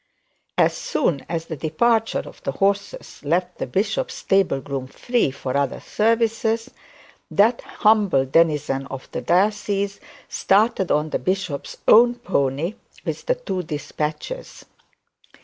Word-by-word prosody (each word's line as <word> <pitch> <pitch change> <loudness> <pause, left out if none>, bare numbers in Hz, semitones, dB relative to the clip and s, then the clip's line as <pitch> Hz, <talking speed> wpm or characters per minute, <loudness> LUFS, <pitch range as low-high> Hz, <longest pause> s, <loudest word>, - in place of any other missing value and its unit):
As - - +4
soon 250 - -1
as 165 -1 -2
the 165 - -5
departure 220 - +1
of - - -13
the - - -3
horses 200 -3 -1
left 175 +4 -1
the - - -2
bishop's 225 - -1
stable 195 -7 +2
groom 135 -1 -5
free 240 - 0
for 130 -1 -5
other 140 -2 0
services, 225 0 0 0.6
that 225 +4 +3
humble 205 - +2
denizen 150 -2 +2
of 135 -1 -8
the - - -3
diocese 200 +1 +1 0.3
started 200 -2 +2
on 150 +1 +1
the - - 0
bishop's 185 -6 -3
own 240 +2 +7
pony 160 - -1 0.3
with - - -4
the - - +3
two 345 - -3
despatches. 155 - -5
190 Hz, 130 wpm, -22 LUFS, 150-220 Hz, 0.6 s, own